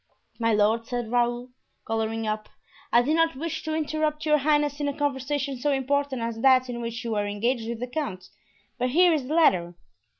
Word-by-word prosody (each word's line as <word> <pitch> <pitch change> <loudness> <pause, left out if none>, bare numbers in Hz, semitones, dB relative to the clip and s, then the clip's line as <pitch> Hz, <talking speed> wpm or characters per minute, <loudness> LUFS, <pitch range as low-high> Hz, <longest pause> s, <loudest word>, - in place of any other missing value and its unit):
"My 230 0 +2
lord," 220 +2 +2
said 240 -2 -3
Raoul, 240 +1 0 0.3
coloring 225 0 -2
up, 215 0 -3 0.4
"I 240 - +5
did 300 +5 +1
not 330 -2 +2
wish 320 +4 -4
to 315 0 -3
interrupt 310 0 -1
your 300 -1 +4
highness 295 0 +1
in 290 - -1
a 285 - -3
conversation 275 -1 -2
so 290 +3 +1
important 275 -1 0
as 230 -1 -4
that 255 -1 +5
in 240 0 -5
which 230 -1 -5
you 230 - -3
were 205 -1 0
engaged 225 +3 -1
with 235 -1 -4
the 250 - -2
count. 245 -9 -4 0.5
But 250 +1 +1
here 350 +5 +5
is 285 -5 -1
the 305 - -1
letter." 180 - +3
255 Hz, 200 wpm, -26 LUFS, 230-295 Hz, 0.5 s, I